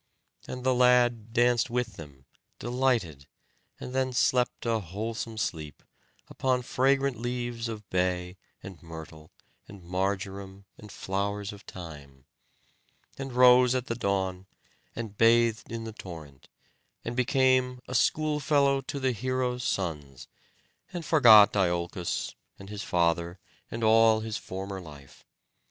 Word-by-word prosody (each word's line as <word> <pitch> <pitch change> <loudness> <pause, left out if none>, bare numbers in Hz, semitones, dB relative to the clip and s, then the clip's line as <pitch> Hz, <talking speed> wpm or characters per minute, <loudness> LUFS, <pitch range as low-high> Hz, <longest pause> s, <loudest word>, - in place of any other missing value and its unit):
And 125 0 -6
the 130 0 +3
lad 125 -3 +3
danced 120 0 +2
with 120 -2 -2
them, 70 -6 -12 0.3
delighted, 120 - -1 0.5
and 125 - -7
then 130 -1 0
slept 125 0 +1
a 115 -1 +1
wholesome 110 +4 -5
sleep, 80 -8 -4 0.4
upon 130 -1 -1
fragrant 135 0 +1
leaves 120 -1 -3
of 105 -3 -7
bay, 90 0 -1 0.3
and 95 -6 -10
myrtle, 80 -1 -11 0.4
and 100 -3 -13
marjoram, 95 +2 -3
and 105 -1 -13
flowers 100 +1 -3
of 100 - -12
thyme; 70 -6 -11 0.9
and 135 -1 -5
rose 125 0 +6
at 130 -1 -1
the 115 - -2
dawn, 95 -4 -2 0.5
and 110 -3 -7
bathed 115 -1 +3
in 115 -1 -4
the 110 -1 -7
torrent, 80 -9 -11 0.6
and 115 - -4
became 130 0 +2
a - - -6
schoolfellow 145 0 +2
to 145 0 -5
the 130 -1 +1
heroes' 125 +1 -2
sons, 75 - -3 0.6
and 175 -3 -6
forgot 110 -11 +7
Iolcos, 85 -2 -1 0.2
and 95 +1 -11
his 105 -1 -5
father, 85 0 0 0.3
and 115 0 -5
all 110 0 +5
his 110 -1 -4
former 95 0 -6
life. 75 -5 -14
110 Hz, 130 wpm, -28 LUFS, 90-125 Hz, 0.9 s, forgot